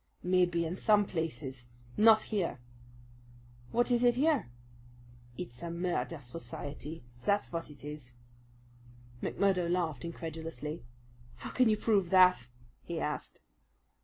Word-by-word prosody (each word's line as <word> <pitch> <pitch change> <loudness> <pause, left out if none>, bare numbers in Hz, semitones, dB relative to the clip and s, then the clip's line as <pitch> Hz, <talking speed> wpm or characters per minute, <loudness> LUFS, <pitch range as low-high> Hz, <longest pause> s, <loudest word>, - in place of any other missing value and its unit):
"Maybe 175 -2 +2
in 165 +2 -3
some 205 +1 +4
places. 150 -8 -4 0.3
Not 220 0 +7
here!" 195 -8 -1 1.1
"What 240 +1 +2
is 240 0 +3
it 240 -1 +5
here?" 285 - +2 0.9
"It's 120 +1 -7
a 170 - -4
murder 170 -5 -2
society, 150 +2 -7 0.2
that's 205 0 +1
vat 165 -2 -4
it 145 -1 -13
is." 150 -5 -8 1.1
McMurdo 185 -3 +1
laughed 165 -7 0
incredulously. 165 -2 -5 0.5
"How - - -8
can 255 -3 +4
you 215 - +3
prove 200 -5 +2
that?" 180 -9 +6 0.3
he 170 -1 -4
asked. 150 -1 -4
170 Hz, 120 wpm, -32 LUFS, 155-200 Hz, 1.1 s, Not